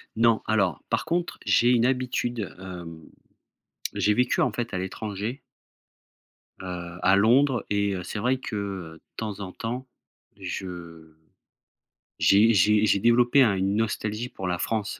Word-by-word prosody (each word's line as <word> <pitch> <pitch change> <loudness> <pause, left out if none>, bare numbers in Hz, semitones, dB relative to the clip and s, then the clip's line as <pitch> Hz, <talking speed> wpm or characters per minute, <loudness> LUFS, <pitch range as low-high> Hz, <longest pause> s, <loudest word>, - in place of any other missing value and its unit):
Non. 115 0 +3
Alors, 100 -7 +1
par - - 0
contre, 175 +1 -1
j'ai 120 - +4
une 120 -1 +3
habitude, 125 -4 -1
hem, 90 -3 -8 1.0
j'ai 105 - +2
vécu, 125 +3 +1
en - - +2
fait, 120 -4 -4
à - - -1
l'étranger 105 +6 -4 1.2
heu, 90 -2 -6
à 95 - +5
Londres 120 +6 +3
et 100 0 +1
heu, 90 - -5
c'est 105 - -5
vrai 125 +4 +1
que 100 -8 -5
de 80 - -19 0.2
temps 105 -3 -4
en 95 -2 -6
temps, 120 +6 -5 0.5
je 85 -3 -7 1.1
j'ai 105 +4 +5
j'ai 105 +2 +4
j'ai 100 - +3
développé 120 +4 +5
un 105 -5 +3
une 95 +1 0
nostalgie 110 +1 -2
pour 95 - -6
la 90 -1 -1
France. 105 0 -2
105 Hz, 150 wpm, -26 LUFS, 95-120 Hz, 1.2 s, à